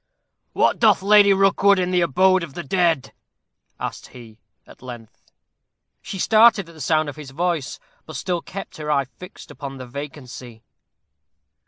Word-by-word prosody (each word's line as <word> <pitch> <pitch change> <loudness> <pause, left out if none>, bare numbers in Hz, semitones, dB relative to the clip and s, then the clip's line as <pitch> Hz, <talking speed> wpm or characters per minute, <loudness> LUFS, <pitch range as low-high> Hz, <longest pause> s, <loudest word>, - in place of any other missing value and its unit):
"What - - +2
doth 215 -4 +4
Lady 205 0 +6
Rookwood 195 +1 +4
in 180 0 -1
the 180 -1 +2
abode 185 +4 +3
of 155 -5 -8
the 175 - -5
dead?" 165 -3 0 0.7
asked - - -6
he, 115 -3 -14 0.3
at - - -17
length. 120 -3 -12 0.7
She 195 - -7
started 215 -1 +4
at 170 - -14
the 155 - -12
sound 155 +2 +1
of 145 - -7
his 150 -3 -9
voice, 165 0 -2 0.3
but 155 - -9
still 175 +4 -2
kept 195 +3 -9
her 150 -1 -6
eye 140 -2 +1
fixed 180 +8 -13
upon 135 -1 -8
the 130 - -8
vacancy. 125 -3 -9
160 Hz, 160 wpm, -22 LUFS, 135-190 Hz, 0.7 s, Lady